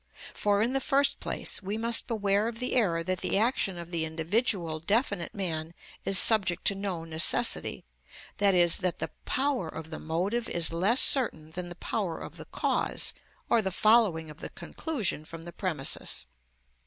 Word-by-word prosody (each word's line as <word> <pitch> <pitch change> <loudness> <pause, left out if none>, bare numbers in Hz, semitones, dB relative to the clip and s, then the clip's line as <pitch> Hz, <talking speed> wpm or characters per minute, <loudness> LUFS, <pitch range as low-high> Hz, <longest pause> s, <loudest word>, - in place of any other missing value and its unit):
For, 205 0 +2
in 240 +3 0
the 270 - +2
first 280 0 +2
place, - - -2
we 200 +2 -4
must 230 +1 0
beware 205 -2 +1
of 230 -1 -5
the 250 +1 -1
error 175 -9 +2
that 185 +1 -1
the - - +1
action 210 -4 +1
of 170 0 -8
the 165 -2 0
individual 165 +1 0
definite 200 - 0
man 165 -4 -3 0.3
is 195 - +4
subject 195 -6 +3
to - - +5
no 195 -4 -4
necessity, 160 - +1 0.5
i.e., 190 -4 +5
that 180 -2 0
the - - -4
power 265 - -1
of 160 +1 -8
the 155 - -6
motive 195 +9 -2
is 165 -1 0
less 205 - +3
certain 160 - +2
than 175 +1 -5
the 175 - -8
power 180 -2 -3
of - - -9
the - - -9
cause, - - 0 0.3
or 230 - +3
the 190 - -1
following 190 -6 +3
of 150 - -15
the - - -6
conclusion 220 - -3
from 165 +1 -10
the 170 0 -9
premises. 160 -8 0
190 Hz, 175 wpm, -28 LUFS, 165-225 Hz, 0.5 s, to